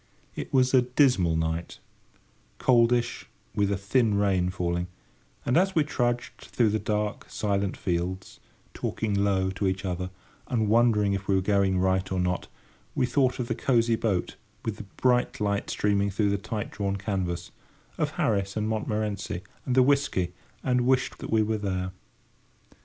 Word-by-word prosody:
It - - -5
was 130 -1 +3
a 130 - +7
dismal 125 - +3
night, 80 +1 -2 0.8
coldish, 120 -1 +2 0.3
with 100 -1 +1
a 100 - +1
thin 105 +2 +2
rain 95 -3 +2
falling; 90 -1 -2 0.6
and 125 - +1
as 190 +2 +2
we 160 - +4
trudged 120 -4 -1
through 115 -3 +1
the 110 +1 0
dark, 105 0 -2
silent 100 -2 -1
fields, 90 +1 -3 0.3
talking 110 -2 -2
low 100 -1 +1
to 95 +1 -1
each 95 +1 -2
other, 90 0 -2 0.4
and 110 -4 0
wondering 110 -3 +4
if 100 0 -3
we 100 - +3
were 95 - +3
going 100 -1 +2
right 95 +1 +1
or 95 - 0
not, 90 0 -1 0.5
we 130 - +2
thought 130 0 +2
of 125 -3 -3
the - - 0
cosy 115 -3 +2
boat, 100 -6 -1 0.3
with 110 -2 -2
the 105 - -8
bright 125 -1 +2
light 100 -1 -1
streaming 100 -1 +1
through 100 +1 +1
the 100 - +1
tight 105 +1 -4
drawn 100 -1 -2
canvas; 95 -3 -3 0.5
of - - +1
Harris 100 -1 0
and 105 0 0
Montmorency, 105 -4 -2 0.2
and 125 - +1
the 130 - +6
whisky, 125 -10 +1 0.3
and 125 -1 +2
wished 130 -1 +1
that - - -7
we 110 -1 +3
were 110 0 -1
there. 95 -2 -2
100 Hz, 165 wpm, -27 LUFS, 95-120 Hz, 0.8 s, a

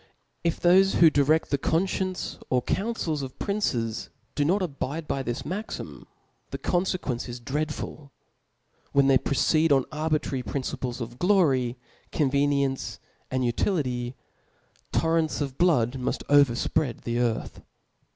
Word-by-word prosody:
If 170 -1 0
thofe 190 +2 +5
who 165 -2 +7
direft 150 +3 +2
the 140 - +1
qpnfcience 185 +4 -1
or'councils 160 - -1
of 130 -1 -7
pnnces 120 - -1 0.2
do 145 - +1
not 185 +7 +2
^bidab^ 140 -3 -3
this 120 0 -3
maxim 205 +7 -6 0.4
the - - -4
confequence 175 -9 -1
is 120 0 -6
dreadful: 145 +2 -4 0.8
whp 140 -1 +5
thej(. 135 -1 +4
proceed 155 +3 +2
on 135 -2 +4
arbitrary 155 -3 -1
principles 125 -1 -4
of 120 +1 -7
glory, 140 -11 +3 0.3
convc 140 -1 +2
niency, 140 -2 -1 0.3
and 130 -1 0
utility; 125 - -1 0.8
torrents 165 -1 +1
of 135 -3 -4
l^ood 150 -10 +3
muft 125 - -2
over 140 -4 +6
fpread 125 +1 -1
the 120 0 -2
earth. 120 -2 -1
140 Hz, 125 wpm, -26 LUFS, 130-165 Hz, 0.8 s, who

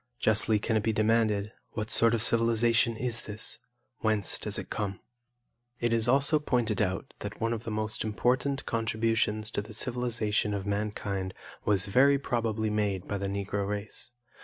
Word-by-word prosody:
Justly 110 -1 +3
can 110 +2 -1
it - - +1
be 110 - +1
demanded 110 -1 +2 0.2
'What 110 -1 -3
sort 115 0 +5
of 115 - 0
civilization 115 0 +3
is 120 -2 -2
this? 105 +1 -7 0.4
Whence 110 -3 +2
does - - -2
it - - -7
come?'" 100 -3 -3 0.8
It 120 -1 +1
is 115 0 +1
also 140 +4 +4
pointed 120 -7 0
out 95 +5 -2
that 105 0 -6
one 115 +1 0
of 115 0 -5
the - - -3
most 110 0 -2
important 125 +5 0
contributions 110 -1 0
to 100 - -1
the 105 +1 -9
civilization 115 -4 0
of 100 -1 -4
mankind 100 -2 -2 0.3
was 100 -3 +3
very 135 +7 +4
probably 115 -5 -1
made 100 -3 -1
by 100 - -2
the 100 - -2
Negro 100 0 -2
race. 105 +1 -3
110 Hz, 165 wpm, -29 LUFS, 105-115 Hz, 0.8 s, sort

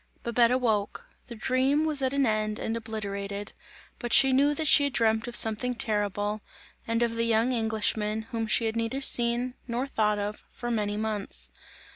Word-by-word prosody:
Babette 235 0 +2
awoke 225 -5 -1 0.2
the 235 - -9
dream 265 +6 0
was 300 -3 0
at 260 -1 0
an 280 -1 +1
end 215 -1 -1
and 225 - -3
obliterated; 205 -2 -6 0.5
but 240 -1 -5
she 270 +1 +7
knew 285 +3 +2
that 315 +1 -2
she 285 +1 +6
had 280 - -2
dreamt 220 0 +1
of 240 - -6
something 225 +3 +3
terrible, 205 -1 -1 0.5
and 230 +1 0
of 235 -1 -1
the 230 0 -1
young 230 +2 +1
Englishman, 220 -2 -1
whom 225 -2 -3
she 225 +2 +2
had 220 0 -2
neither 230 +4 -2
seen, 240 -1 +3
nor 240 +2 -2
thought 210 -6 0
of, 205 +1 -5
for 240 -1 -6
many 210 -2 -2
months. 205 - -4
230 Hz, 180 wpm, -26 LUFS, 215-250 Hz, 0.5 s, she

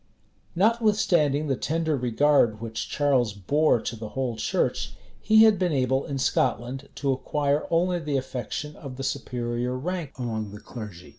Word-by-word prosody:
[] - - -39
Notwithstanding 195 -8 +2
the 135 -3 0
tender 160 +3 -1
regard 125 -2 +2
which 115 -1 -5
Charles 130 -7 +2
bore 125 - +2
to 115 - -4
the 110 -1 -7
whole 130 -2 -2
church, 110 - -1 0.3
he 220 0 +6
had 215 -4 +5
been 180 -2 +1
able 130 0 +1
in 140 - -3
Scotland 130 +1 0
to 140 -2 0
acquire 140 +2 0
only 175 +1 +2
the 150 -4 -1
affection 130 +3 -4
of 135 -4 -8
the 135 - -5
superior 125 -2 -2
rank 165 0 -4
among 110 -5 -4
the 105 - -8
clergy. 105 - -9
135 Hz, 160 wpm, -26 LUFS, 120-155 Hz, 0.3 s, he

